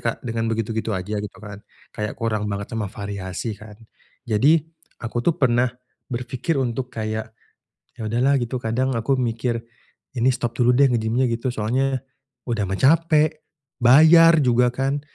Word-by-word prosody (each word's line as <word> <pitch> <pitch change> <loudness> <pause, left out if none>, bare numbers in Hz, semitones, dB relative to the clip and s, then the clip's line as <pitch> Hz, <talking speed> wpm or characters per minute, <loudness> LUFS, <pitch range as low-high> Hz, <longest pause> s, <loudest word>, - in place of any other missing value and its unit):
Kak 115 +2 -3
dengan 115 -1 -2
begitu-gitu 115 0 -2
aja 105 +3 -3
gitu 105 - -8
kan, 105 -1 -10 0.3
kayak 105 0 -4
kurang 110 -2 -2
banget 100 0 -5
sama 110 -3 -2
variasi 100 +1 -5
kan? 105 0 -12 0.5
Jadi, 140 +8 +3 0.3
aku 120 0 -3
tuh 160 +7 +1
pernah 125 -1 +2 0.4
berpikir 125 +5 -3
untuk 125 -1 -2
kayak, 110 -1 -4 0.7
ya - - -8
udahlah 125 +6 +2
gitu, 125 0 -3
kadang 130 +4 -1
aku 115 +3 0
mikir 115 -1 -2 0.5
ini 125 0 +2
stop 120 -2 -1
dulu 125 0 +4
deh, 140 - +6
nge-gym 110 0 -1
nya 130 - +3
gitu. 115 +2 -2
Soalnya, 130 +4 -1 0.4
udah 115 -4 -1
mah 95 - -2
capek, 155 +1 +3 0.4
bayar 160 +7 +7
juga 125 0 +3
kan? 135 +3 -2
120 Hz, 155 wpm, -22 LUFS, 110-130 Hz, 0.7 s, bayar